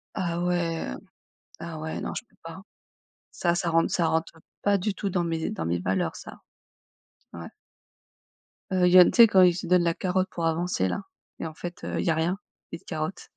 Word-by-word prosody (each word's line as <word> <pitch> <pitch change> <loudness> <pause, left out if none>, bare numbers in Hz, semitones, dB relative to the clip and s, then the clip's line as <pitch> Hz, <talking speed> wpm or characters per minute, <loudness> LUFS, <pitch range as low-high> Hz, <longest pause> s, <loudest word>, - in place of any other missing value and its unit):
Ah 175 -3 -2
ouais. 175 -2 -1 0.7
Ah 165 -2 -6
ouais, 160 +1 -5
non, - - -4
je - - -5
peux - - -31
pas. 165 +3 -9 0.7
Ça, 170 -1 0
ça 175 0 -1
rentre 165 0 +2
ça 170 -2 +2
rentre, 160 0 0
heu, 160 - -18 0.2
pas 200 -1 +3
du 195 +2 -2
tout 200 +1 -3
dans 175 -1 0
mes 165 -1 -2
dans 80 -6 -4
mes 85 +1 0
valeurs 95 +1 -1
ça. - - -11 0.9
Ouais. 85 -1 -8 1.2
Heu, 185 -1 +3
il 180 - +4
y 185 - +10
a 180 - +10
tu - - +1
sais 235 -2 +9
quand 190 -2 +5
ils 175 -1 +6
se 180 - -5
donnent 180 0 +4
la 170 -1 +2
carotte 185 +1 -1
pour 170 - -3
avancer 165 - 0
là 200 - -3 0.4
et - - -4
en 160 - -6
fait, 175 +2 -8
heu, - - -3
il - - -1
y - - +1
a 160 - +3
rien, 170 +4 0 0.3
ils 165 - -6
te - - -30
carottent. 160 +2 -5
170 Hz, 225 wpm, -26 LUFS, 160-180 Hz, 1.2 s, y